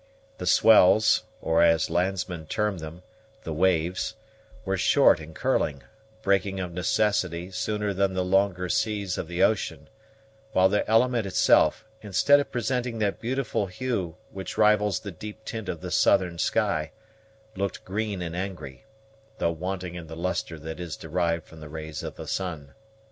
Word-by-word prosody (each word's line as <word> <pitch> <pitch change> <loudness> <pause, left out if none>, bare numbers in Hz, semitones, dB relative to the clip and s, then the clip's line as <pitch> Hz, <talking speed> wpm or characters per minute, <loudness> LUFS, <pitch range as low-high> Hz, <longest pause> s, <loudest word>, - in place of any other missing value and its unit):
The 90 - -4
swells, 110 +2 +6 0.2
or, 80 +1 +3
as 85 -1 +3
landsmen 90 -2 -1
term 105 -2 -1
them, 80 +3 -9 0.4
the 80 - -4
waves, 90 +4 +1 0.5
were 95 0 0
short 90 - +4
and 80 0 -11
curling, 70 -3 0 0.4
breaking 100 0 +1
of 90 -2 -4
necessity 90 -1 0
sooner 105 +2 -2
than 95 0 0
the 90 0 0
longer 95 -1 +1
seas 105 -2 -1
of - - -4
the 90 +2 0
ocean; 80 -8 0 0.6
while 95 0 +5
the 105 +1 0
element 115 -1 +3
itself, 95 - +3 0.2
instead 105 +8 +4
of 140 - -3
presenting 125 -1 -1
that 105 -2 -1
beautiful 120 -4 -1
hue 95 -5 -3 0.2
which 95 -1 -7
rivals 105 -2 +3
the 100 - -6
deep 105 +5 -10
tint 110 -3 -5
of 85 -3 -4
the - - -6
southern 85 -2 +3
sky, 80 -1 0 0.7
looked 100 0 -3
green 100 -1 -3
and 85 0 -5
angry, 90 -6 -6 0.5
though 85 - +1
wanting 90 +1 -4
in 85 -2 -8
the 80 +1 -9
lustre 85 -2 -2
that 80 +2 -7
is 85 -3 -5
derived 85 0 -1
from 80 - -14
the 75 -1 -10
rays 80 -1 -6
of - - -6
the - - -8
sun. 80 -7 -4
95 Hz, 160 wpm, -26 LUFS, 85-105 Hz, 0.7 s, swells